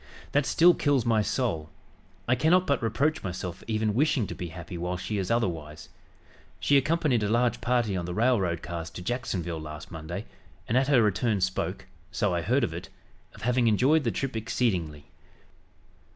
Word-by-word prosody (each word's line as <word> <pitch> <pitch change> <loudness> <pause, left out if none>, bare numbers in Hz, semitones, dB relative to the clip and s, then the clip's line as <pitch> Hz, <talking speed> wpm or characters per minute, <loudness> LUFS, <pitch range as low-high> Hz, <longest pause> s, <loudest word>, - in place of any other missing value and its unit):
That 145 0 +2
still 175 +2 +6
kills 140 -7 +1
my 115 -2 +3
soul. 100 -7 -1 0.6
I 125 - +4
cannot 160 +9 +3
but 140 -5 +1
reproach 145 +7 0
myself 90 -1 -5
for - - -17
even 110 -1 0
wishing 135 -1 +2
to - - -6
be 90 - -5
happy 85 +1 -8
while 90 +1 -3
she 100 +3 -3
is 95 - -2
otherwise. 80 -9 -2 0.7
She 140 - +3
accompanied 140 -3 +2
a 105 - 0
large 120 +2 +1
party 120 -4 +1
on 90 -2 -2
the 90 - -4
railroad 105 -8 +1
cars 85 -2 -5
to 90 - -9
Jacksonville 90 -8 -3
last 75 0 -8
Monday, 85 +5 -6 0.4
and 115 - 0
at 130 +1 +3
her 135 -5 +5
return 105 +1 +1
spoke, 95 0 -2 0.3
so 100 -3 0
I 85 - 0
heard 125 +9 +1
of 110 - -1
it, 85 - -7 0.5
of - - -12
having 125 0 +2
'enjoyed 135 +9 +4
the 120 - +1
trip 135 +1 -3
exceedingly.' 90 - -1
110 Hz, 180 wpm, -27 LUFS, 90-125 Hz, 0.7 s, still